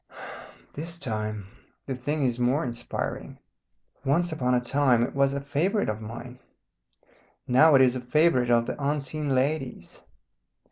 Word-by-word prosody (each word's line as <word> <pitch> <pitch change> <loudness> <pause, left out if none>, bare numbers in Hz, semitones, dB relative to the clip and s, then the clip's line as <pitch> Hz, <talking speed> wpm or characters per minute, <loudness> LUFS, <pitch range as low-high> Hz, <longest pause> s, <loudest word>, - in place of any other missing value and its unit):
This 165 +3 -4
time 110 - -3 0.4
the 135 - -3
thing 145 +4 -2
is 125 -2 0
more 125 +5 +1
inspiring. 120 -1 -5 0.7
Once 165 +6 +1
upon 125 -5 0
a - - +3
time 125 -1 +2
it - - -3
was 140 0 +2
a - - -1
favourite 160 - 0
of 110 +1 -4
mine. 120 +3 -9 1.1
Now 145 +5 +6
it 130 - +7
is 125 -1 +3
a 130 - -3
favourite 125 -1 +2
of 120 -1 +3
the 140 - -5
unseen 145 0 -1
lady's. 135 0 -2
130 Hz, 145 wpm, -26 LUFS, 120-150 Hz, 1.1 s, it